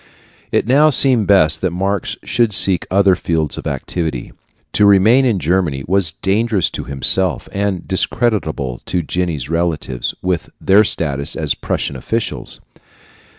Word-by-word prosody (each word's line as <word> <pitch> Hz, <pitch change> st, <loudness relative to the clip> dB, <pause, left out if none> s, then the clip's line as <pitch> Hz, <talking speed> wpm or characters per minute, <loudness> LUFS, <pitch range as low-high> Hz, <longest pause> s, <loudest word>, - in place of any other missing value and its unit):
It -, -, +1 dB
now 145 Hz, +6 st, +4 dB
seemed 130 Hz, -6 st, +3 dB
best 80 Hz, -6 st, +4 dB
that 95 Hz, -, +1 dB
Marx 95 Hz, +2 st, -2 dB
should 115 Hz, -3 st, 0 dB
seek 95 Hz, -3 st, +2 dB
other 95 Hz, 0 st, +3 dB
fields 80 Hz, -4 st, -2 dB
of -, -, -6 dB
activity. 80 Hz, -8 st, -4 dB, 0.4 s
To 105 Hz, -, +4 dB
remain 110 Hz, +7 st, +5 dB
in 115 Hz, -6 st, +1 dB
Germany 85 Hz, -5 st, -1 dB
was 90 Hz, -3 st, +1 dB
dangerous 105 Hz, -1 st, +1 dB
to -, -, -6 dB
himself 80 Hz, +7 st, 0 dB
and 100 Hz, -3 st, -2 dB
discreditable 90 Hz, -, -1 dB
to 90 Hz, -, -1 dB
Jenny's 80 Hz, -5 st, -3 dB
relatives, 80 Hz, -6 st, -2 dB
with 90 Hz, -2 st, -2 dB
their 100 Hz, +3 st, +4 dB
status 75 Hz, -5 st, -1 dB
as 75 Hz, -3 st, -1 dB
Prussian -, -, -3 dB
officials. 110 Hz, -, -4 dB
95 Hz, 140 wpm, -17 LUFS, 80-100 Hz, 0.4 s, remain